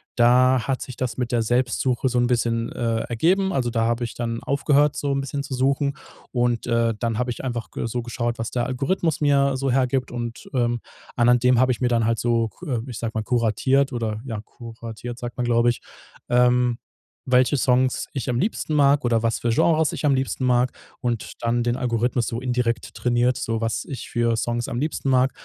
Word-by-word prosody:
da 125 +1 +4
hat 135 -1 -1
sich 130 - -7
das 125 -3 -3
mit 125 -1 -2
der 115 -2 +2
Selbstsuche 125 +1 +1
so 125 - -1
'n 120 - +3
bisschen, 115 -1 0
äh, 115 -1 -1
ergeben. 185 - +1
Also 125 -5 0
da 115 -1 0
habe 120 +1 0
ich 115 - -5
dann 115 -1 -3
aufgehört 145 +1 +2
so 140 -1 -1
'n 135 0 0
bisschen 140 +1 -4
zu 135 - -6
suchen. 140 +2 +1 0.4
Und, 120 -2 0
äh, 115 -1 +1
dann 115 -1 -1
habe 125 - -1
ich 120 - -7
einfach 120 -3 -4
ge - - -4
so 120 +2 -3
geschaut, 120 0 -3
was 115 - -2
der 120 -1 -1
Algorithmus 150 +6 -1
mir 140 -2 +3
so 135 0 -1
hergibt. 130 0 +1
Und, 120 -1 -6
ähm, 120 -1 +1 0.3
anhand 120 0 +4
dem 125 -1 +4
habe 130 0 +4
ich 120 - -2
mir 125 - +3
dann 115 -2 +2
halt 115 0 +1
so 115 -1 +1
ku 135 -6 -4
ich 120 - -6
sag 115 -1 -3
mal 110 - -1
kuratiert 125 +4 +1
oder, 110 -2 -2
ja 110 -5 -4
kuratiert 115 +1 -9
sagt 120 0 -6
man, 125 - -1
glaube 120 0 +3
ich, 120 - -2 0.5
ähm, 125 0 +3 0.5
welche 130 +2 +3
Songs 130 0 +2
ich 135 -2 -3
am 120 - 0
liebsten 160 - -1
mag 140 -2 +4
oder 115 -1 +2
was 115 -1 0
für 120 - -1
Genres 160 +6 +3
ich - - -3
am 140 - +4
liebsten 130 0 -2
mag 125 0 +2 0.3
und 120 -3 -2
dann 120 0 +1
den 120 +1 0
Algorithmus 120 -1 0
so 115 +1 -3
indirekt 125 -2 -1
trainiert, 120 0 +1
so 115 0 -2
was 115 -1 -1
ich 130 -4 -7
für 120 -1 +1
Songs 120 +1 -1
am 120 - -4
liebsten 145 -1 -2
mag. 130 0 +3
120 Hz, 210 wpm, -23 LUFS, 115-130 Hz, 0.5 s, da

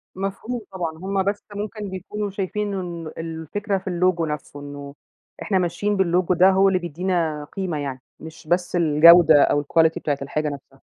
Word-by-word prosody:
مفهوم 195 +5 -4
طبعًا، 170 -4 -4
هم 190 +2 -1
بس 200 +1 -2
ممكن 210 0 -5
بيكونوا 200 +3 -5
شايفين 200 +1 -3
إنه 170 -4 -5
الفكرة 165 +6 -3
في 190 - -10
اللوجو 180 -1 +1
نفسه، 150 -1 -6
إنّه 145 0 -9 0.5
إحنا 195 - 0
ماشيين 205 +4 -1
باللوجو 180 -1 +2
ده، 185 +2 +5
هو 195 +1 +4
اللي 190 -1 +2
بيدّينا 170 -2 -2
قيمة 185 -6 -3
يعني، 135 -3 -5 0.2
مش 160 0 -12
بس 175 +2 0
الجودة 160 -1 +7
أو 145 - +1
الquality 160 +2 +2
بتاعة 145 -2 -1
الحاجة 150 +2 -2
نفسها. 135 -1 -11
175 Hz, 165 wpm, -22 LUFS, 155-195 Hz, 0.5 s, الجودة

